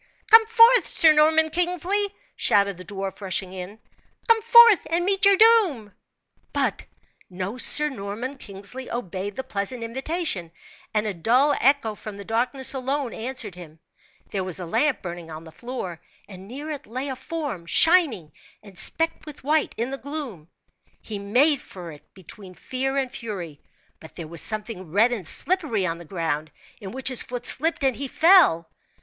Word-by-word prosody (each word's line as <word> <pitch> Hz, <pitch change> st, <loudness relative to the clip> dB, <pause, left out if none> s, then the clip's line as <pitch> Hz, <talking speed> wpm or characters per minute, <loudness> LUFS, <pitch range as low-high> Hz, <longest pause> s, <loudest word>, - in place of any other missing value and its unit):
"Come 445 Hz, 0 st, +8 dB
forth, 465 Hz, +2 st, +5 dB
Sir 320 Hz, -3 st, +5 dB
Norman 315 Hz, +1 st, +3 dB
Kingsley!" 360 Hz, +4 st, +2 dB, 0.3 s
shouted 200 Hz, -2 st, +1 dB
the -, -, -9 dB
dwarf, 195 Hz, 0 st, -7 dB
rushing 190 Hz, -1 st, -4 dB
in. 190 Hz, +3 st, -9 dB, 0.5 s
"Come 455 Hz, -1 st, +4 dB
forth 470 Hz, -2 st, +6 dB
and 340 Hz, +2 st, 0 dB
meet 395 Hz, +1 st, +2 dB
your 395 Hz, -1 st, +6 dB
doom!" 370 Hz, -, +3 dB, 0.6 s
But -, -, -1 dB, 0.4 s
no 190 Hz, +6 st, -6 dB
Sir 300 Hz, +3 st, +6 dB
Norman 245 Hz, +2 st, -7 dB
Kingsley 205 Hz, +6 st, -9 dB
obeyed 195 Hz, -3 st, -5 dB
the 265 Hz, -, -5 dB
pleasant 210 Hz, +4 st, -5 dB
invitation, 265 Hz, -, -4 dB, 0.4 s
and 210 Hz, 0 st, 0 dB
a 210 Hz, -, -3 dB
dull 250 Hz, -, +2 dB
echo 270 Hz, -4 st, +2 dB
from 210 Hz, -1 st, -10 dB
the 200 Hz, -, -10 dB
darkness 250 Hz, +4 st, -1 dB
alone 270 Hz, 0 st, -3 dB
answered 235 Hz, -3 st, -6 dB
him. 165 Hz, -3 st, -13 dB, 0.5 s
There 195 Hz, -2 st, -3 dB
was 185 Hz, -1 st, +1 dB
a 180 Hz, -, -6 dB
lamp 280 Hz, -, 0 dB
burning 175 Hz, -2 st, -8 dB
on 155 Hz, 0 st, -9 dB
the 160 Hz, -, -13 dB
floor, 215 Hz, -7 st, -7 dB, 0.3 s
and 190 Hz, -1 st, -12 dB
near 285 Hz, +7 st, -7 dB
it 290 Hz, -1 st, -8 dB
lay 255 Hz, +5 st, -4 dB
a 265 Hz, -, -4 dB
form, 260 Hz, -, -6 dB
shining 265 Hz, -, +3 dB, 0.3 s
and 195 Hz, -3 st, -10 dB
specked 325 Hz, +7 st, +1 dB
with 300 Hz, -, -10 dB
white 300 Hz, +2 st, 0 dB
in 235 Hz, +3 st, -3 dB
the 275 Hz, -, -6 dB
gloom. 275 Hz, -, -7 dB, 0.5 s
He 210 Hz, -2 st, -7 dB
made 255 Hz, +9 st, +2 dB
for 175 Hz, -3 st, -11 dB
it 150 Hz, -, -17 dB
between 190 Hz, 0 st, -12 dB
fear 270 Hz, +5 st, -4 dB
and 265 Hz, -2 st, -2 dB
fury, 180 Hz, -10 st, -8 dB, 0.4 s
but 160 Hz, -, -14 dB
there 165 Hz, -3 st, -8 dB
was 170 Hz, +1 st, -2 dB
something 215 Hz, -5 st, -2 dB
red 220 Hz, +7 st, +3 dB
and 205 Hz, -9 st, -4 dB
slippery 300 Hz, -, +1 dB
on 165 Hz, -2 st, -3 dB
the 170 Hz, -, -12 dB
ground, 160 Hz, -3 st, -4 dB, 0.3 s
in 200 Hz, -4 st, -9 dB
which 265 Hz, +5 st, -1 dB
his 255 Hz, -, 0 dB
foot 245 Hz, 0 st, -7 dB
slipped, 325 Hz, +1 st, +3 dB
and 265 Hz, -2 st, +2 dB
he 280 Hz, -, -5 dB
fell. 315 Hz, -, +4 dB
240 Hz, 170 wpm, -23 LUFS, 190-300 Hz, 0.6 s, Come